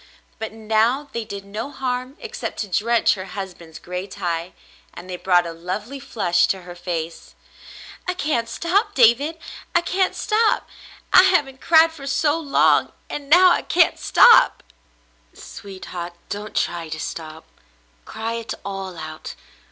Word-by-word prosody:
But 220 - -4
now 225 +6 0
they 235 - -3
did 200 -2 -8
no 210 +6 -5
harm 255 0 -4
except 480 0 -6
to 210 - -4
drench 225 +5 +2
her 185 -2 -6
husband's 175 -4 -8
gray 180 +3 -6
tie, 175 -3 -4 0.4
and 180 - -10
they 185 - -5
brought 180 -1 +2
a 165 - -5
lovely 200 +11 -5
flush 200 -10 +1
to 190 -2 -2
her 175 0 -9
face. 170 -2 -5 0.7
"I 365 - -1
can't 265 -9 -1
stop, 355 - 0
David; 270 +7 +4 0.4
I 345 - +5
can't 370 +2 0
stop. 435 0 +1 0.5
I 365 - +10
haven't 290 -9 +2
cried 325 0 +5
for 285 -4 -10
so 295 +3 +1
long, 290 -4 +3 0.2
and 285 -1 -6
now 360 +3 +7
I - - +2
can't 345 -1 +2
stop." - - +6 0.7
"Sweetheart, 185 -3 -8 0.2
don't 210 +1 -6
try 170 -2 -1
to 160 0 -5
stop. 160 0 -7 0.6
Cry 225 - -5
it 230 -1 -5
all 195 -2 -5
out. 155 -1 -8
220 Hz, 150 wpm, -22 LUFS, 180-290 Hz, 0.7 s, I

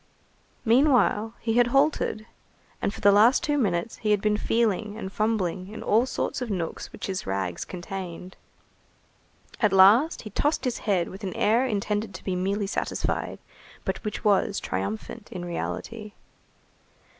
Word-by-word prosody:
Meanwhile 235 -3 +3
he 225 0 0
had 245 -1 +5
halted, 270 -5 +1 0.6
and - - 0
for - - -10
the 200 - +6
last 220 +6 +5
two 295 - +1
minutes 210 -5 0
he 215 - -2
had 210 -1 +4
been 210 +1 +1
feeling 215 -1 0
and 190 -4 -6
fumbling 195 -4 -1
in 215 +2 -8
all 230 +5 +3
sorts 255 - -2
of 250 - -3
nooks 175 -5 -4
which - - -7
his 190 - -4
rags 95 -2 -2
contained. 180 0 -7 1.2
At 215 -4 +3
last 205 - +5
he 215 - -8
tossed 295 +9 0
his 250 - -1
head 180 -4 +2
with 195 +3 -10
an 190 -2 -4
air 235 +5 +3
intended 210 -1 -2
to - - -9
be 185 - -2
merely 195 +3 -1
satisfied, 195 - -2 0.5
but - - -3
which 210 -2 -4
was 200 -1 +2
triumphant, 105 - -5
in 180 -2 -5
reality. 210 +5 -5
210 Hz, 155 wpm, -26 LUFS, 190-230 Hz, 1.2 s, the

